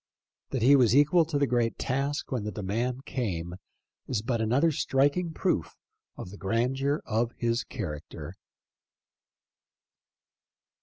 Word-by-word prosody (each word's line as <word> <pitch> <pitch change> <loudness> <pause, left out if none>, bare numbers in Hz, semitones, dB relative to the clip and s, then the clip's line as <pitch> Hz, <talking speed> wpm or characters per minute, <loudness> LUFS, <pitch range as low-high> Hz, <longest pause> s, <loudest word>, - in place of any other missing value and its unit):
That 130 -4 -2
he 140 +4 +7
was 125 -3 +4
equal 150 +4 +5
to 155 -2 -2
the 140 - +3
great 120 -2 0
task 140 +3 -2
when 125 -5 -1
the 105 - -3
demand 120 +7 -2
came 90 -8 -3 0.5
is 115 -5 -1
but 115 -1 -1
another 130 +9 +3
striking 145 +5 +1
proof - - -1 0.4
of 90 - -7
the 100 - -10
grandeur 130 +8 0
of 115 +1 0
his 115 0 0
character. 80 - -6
125 Hz, 125 wpm, -28 LUFS, 110-140 Hz, 0.5 s, he